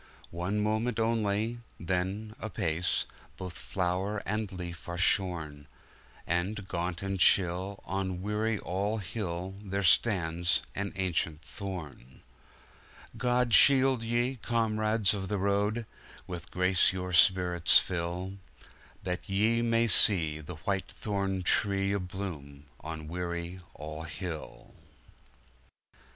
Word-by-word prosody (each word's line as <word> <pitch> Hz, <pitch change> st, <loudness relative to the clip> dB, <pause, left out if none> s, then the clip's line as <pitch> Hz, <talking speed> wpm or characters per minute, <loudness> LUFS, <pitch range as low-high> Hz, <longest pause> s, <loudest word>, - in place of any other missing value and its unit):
One 90 Hz, +5 st, -2 dB
moment 110 Hz, +3 st, 0 dB
only 110 Hz, 0 st, 0 dB
— -, -, -33 dB
then, 95 Hz, +5 st, -2 dB
apace, 90 Hz, -6 st, -1 dB, 0.3 s
Both 90 Hz, -2 st, -6 dB
flower 95 Hz, +5 st, -2 dB
and 105 Hz, 0 st, -2 dB
leaf 85 Hz, -2 st, -7 dB
are 85 Hz, -, -4 dB
shorn; 85 Hz, -6 st, 0 dB, 0.6 s
And, 95 Hz, +4 st, -1 dB
gaunt 85 Hz, 0 st, -3 dB
and 95 Hz, -1 st, -2 dB
chill, 95 Hz, +2 st, +3 dB
on 95 Hz, -1 st, -3 dB
Weary 105 Hz, +2 st, 0 dB
All 100 Hz, +4 st, -2 dB
Hill, 95 Hz, -2 st, -4 dB
There 100 Hz, 0 st, -2 dB
stands 85 Hz, -3 st, +2 dB
an 100 Hz, 0 st, -3 dB
ancient 85 Hz, -4 st, -1 dB
thorn! 80 Hz, -, -8 dB, 0.9 s
God 125 Hz, -1 st, +1 dB
shield 135 Hz, +2 st, +6 dB
ye, 120 Hz, +3 st, 0 dB
comrades 110 Hz, -2 st, +1 dB
of 95 Hz, -2 st, -4 dB
the 105 Hz, -, -1 dB
road 100 Hz, +4 st, 0 dB, 0.2 s
— -, -, -19 dB
With 85 Hz, -1 st, -7 dB
grace 90 Hz, 0 st, +4 dB
your 90 Hz, -1 st, -5 dB
spirits 90 Hz, 0 st, +5 dB
fill, 90 Hz, +2 st, -2 dB, 0.7 s
That 90 Hz, +1 st, -4 dB
ye 110 Hz, +4 st, +2 dB
may 115 Hz, 0 st, +2 dB
see 85 Hz, -9 st, +6 dB
the 85 Hz, +3 st, -8 dB
White 95 Hz, -2 st, -1 dB
thorn 100 Hz, -3 st, -2 dB
tree 100 Hz, +1 st, +1 dB
A 100 Hz, -, 0 dB
bloom 85 Hz, -7 st, -7 dB
on 80 Hz, -1 st, -7 dB
Weary 85 Hz, +1 st, -4 dB, 0.2 s
All 75 Hz, +1 st, -7 dB
Hill! 80 Hz, 0 st, -7 dB
95 Hz, 120 wpm, -30 LUFS, 85-105 Hz, 0.9 s, shield